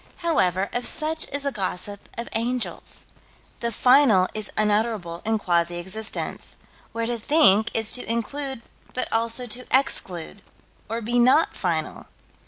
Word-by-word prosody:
However, 190 - +2
of 245 0 -1
such 315 +1 -1
is 285 0 -1
the 280 - 0
gossip 200 -2 -3
of 235 - -4
angels. 240 +2 -3 0.5
The 235 0 -2
final 250 -6 +5
is 215 -2 -2
unutterable 210 -5 0
in 220 0 +2
quasi 175 -3 +1
existence, 190 +5 -4 0.4
where 230 0 -2
to 235 0 -2
think 220 -5 +5
is 225 -1 +1
to 245 -3 -2
include 265 +2 -3 0.3
but 255 - -1
also 230 +2 +1
to 245 +2 -5
exclude, 195 -8 0 0.5
or 230 +1 -3
be 240 +3 +1
not 260 +7 +4
final. 165 -4 -2
225 Hz, 140 wpm, -24 LUFS, 200-250 Hz, 0.5 s, final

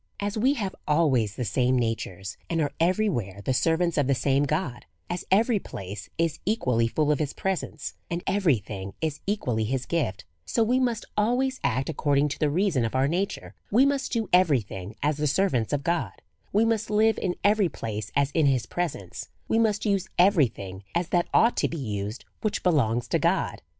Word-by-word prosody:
As 205 0 -2
we 255 +6 +2
have 200 -7 -3
always 135 -10 +2
the 125 - -3
same 125 +2 +2
natures, 100 -5 -3
and 165 - 0
are 145 -2 0
every 185 +6 +2
where 100 - -3
the 130 - +1
servants 165 +4 +1
of 140 - +2
the 135 - +3
same 135 +2 +2
God, 145 -4 -2 0.2
as 175 0 -3
every 220 +2 +3
place 100 - -8
is 165 -2 0
equally 125 - +1
full 150 +5 +1
of 150 - +1
his 150 -2 -2
presence, 190 -3 -3 0.2
and 170 +1 -3
every 190 - +3
thing 100 -1 -7
is 155 -2 -2
equally 125 - 0
his 125 +3 -2
gift, 100 - -2 0.2
so 225 - +1
we 245 +4 +2
must 240 -4 0
always 250 +5 +1
act 130 0 0
according 145 -2 +1
to - - -5
the 150 - +2
reason 165 - +1
of 115 +2 -2
our 130 +1 +3
nature; 185 +6 -2 0.2
Ave 245 +6 +5
must 280 -1 0
do 225 -4 0
every 170 -8 +5
thing 100 0 -8
as 150 0 +1
the 150 0 0
servants 140 - +1
of 145 -1 -1
God; 170 +2 0 0.4
we 215 +3 +3
must 225 -1 0
live 220 +1 +3
in 180 -2 -1
every 205 -3 +4
place 105 -5 -5
as 140 0 +2
in 155 -1 +3
his 130 -4 +2
presence; 140 - -4 0.2
we 225 - +2
must 215 -2 +1
use 195 -3 +1
every 175 -6 +5
thing 95 -3 -9
as 170 0 0
that 175 -1 +1
ought 230 +2 +4
to - - +2
be 165 - -5
used 105 -3 -4 0.2
which 215 - -1
belongs 120 -9 +2
to - - +2
God. - - 0
155 Hz, 200 wpm, -26 LUFS, 120-200 Hz, 0.4 s, Ave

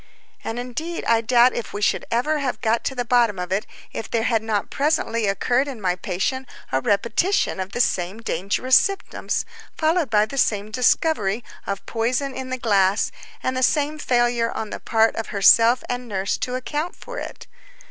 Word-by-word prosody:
And 225 - -4
indeed 280 +8 -4
I 230 -1 +3
doubt 240 +2 +4
if 235 - -5
we 205 - -4
should - - +1
have 230 - +2
ever 295 -4 0
got 230 +1 +1
to 265 - -2
the 245 -1 -2
bottom 235 -4 +3
of 180 0 -5
it, 195 +2 -1 0.3
if - - -5
there 230 -1 0
had 230 -2 +2
not 215 -2 -2
presently 275 -7 0
occurred 245 +7 +1
in 265 -5 -6
my 180 -3 0
patient 200 +9 -3 0.2
a 130 - +1
repetition 230 - +1
of 190 +1 -4
the 245 - +1
same 190 -2 0
dangerous 230 +5 +1
symptoms, 395 -1 0 0.3
followed 320 -2 +1
by 210 -1 +4
the 275 +5 -4
same 210 -3 +1
discovery, 240 - +1 0.2
of 200 -1 -4
poison 245 +4 -1
in 260 0 -6
the 255 - -2
glass, 200 -4 +2 0.3
and 255 - -1
the 255 - -1
same 295 +3 +1
failure 240 -3 +1
on 220 -1 -5
the - - -5
part 225 0 +2
of 225 - -3
herself 230 +4 +5
and 245 0 -4
nurse 195 -2 -1
to 250 - -2
account 295 +6 -3
for - - -8
it. - - -8
235 Hz, 190 wpm, -22 LUFS, 210-260 Hz, 0.3 s, herself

